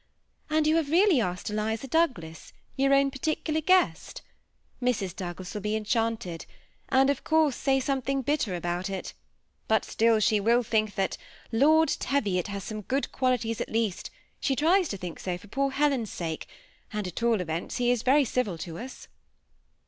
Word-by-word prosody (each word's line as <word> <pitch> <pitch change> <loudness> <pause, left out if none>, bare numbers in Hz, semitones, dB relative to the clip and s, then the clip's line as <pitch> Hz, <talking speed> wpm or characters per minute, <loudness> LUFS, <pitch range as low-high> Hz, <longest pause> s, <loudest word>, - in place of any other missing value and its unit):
And 310 0 +2
you 310 +1 +4
have 315 -4 0
really 345 - +4
asked 180 +1 -3
Eliza 220 +3 -2
Douglas, 235 - -1 0.2
your 275 +1 +2
own 275 0 +4
particular 310 +3 -1
guest? 370 +4 +1 0.6
Mrs. 205 -8 -1
Douglas 180 0 -6
will 210 - -4
be 210 +2 -1
enchanted, 220 -5 -2 0.4
and 270 +1 +4
of 285 - -4
course 315 -4 +3
say 270 -1 +1
something 270 0 -1
bitter 250 -9 0
about 175 +2 -3
it; 195 -1 -5 0.5
but 220 0 +2
still 225 -1 +2
she 215 0 +3
will 235 +4 +3
think 215 -3 0
that 195 -1 0 0.4
^ - - -28
that - - -3
Lord 315 +6 +5
Teviot 200 -11 0
has 200 -1 -5
some 215 +1 -5
good 265 +7 -2
qualities; 245 -3 0
at - - -3
least 220 -4 -1 0.3
she 270 - 0
tries 340 +5 +3
to 200 - -3
think 180 -3 -7
so 180 -2 -3
for 195 - -15
poOr 275 +6 -1
Helen's 275 -6 +1
sake; 165 -2 -4 0.4
and, 210 -2 -3
at 180 +4 -5
all 230 -2 +2
events, 165 -1 -3
he 245 -1 +2
is 245 -3 +1
Yerj 275 +3 +4
civil 220 -8 -1
to 165 0 -7
us. 255 +3 -9
230 Hz, 180 wpm, -27 LUFS, 195-275 Hz, 0.6 s, Lord